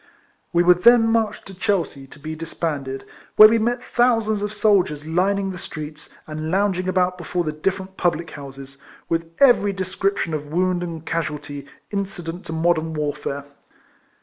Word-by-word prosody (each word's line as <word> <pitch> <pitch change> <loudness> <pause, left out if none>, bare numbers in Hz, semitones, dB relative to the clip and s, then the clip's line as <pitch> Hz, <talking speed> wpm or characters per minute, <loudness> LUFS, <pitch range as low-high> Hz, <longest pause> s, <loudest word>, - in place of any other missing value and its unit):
AVe 175 - +5
were 180 0 +7
then 230 +6 +6
marched 225 -2 0
to 195 - -9
Chelsea, 175 -8 -1
to 135 - -15
be 155 +2 -6
disbanded, 150 -4 -4 0.3
where 215 - +11
we 225 +1 +2
met 240 +2 0
thousands 225 -4 +2
of 205 0 -2
soldiers 200 -9 +2
lining, 195 +4 +1
the 180 - -7
streets, 150 -2 -8 0.2
and 155 0 -5
lounging 185 0 +1
about 180 -1 +1
before 175 +1 -2
the 155 - -2
different 190 +4 -3
public 170 -1 0
houses, 135 -1 -10 0.3
with 165 0 -1
every 245 -7 +5
descrip 190 +1 -1
tion 165 - -2
of 150 -1 -3
wound 180 +1 +1
and 165 -2 -6
casualty 150 -3 -4 0.2
incident 185 -4 -4
to - - -5
modern 160 -1 +1
warfare. 145 -1 -3
175 Hz, 160 wpm, -22 LUFS, 155-195 Hz, 0.3 s, where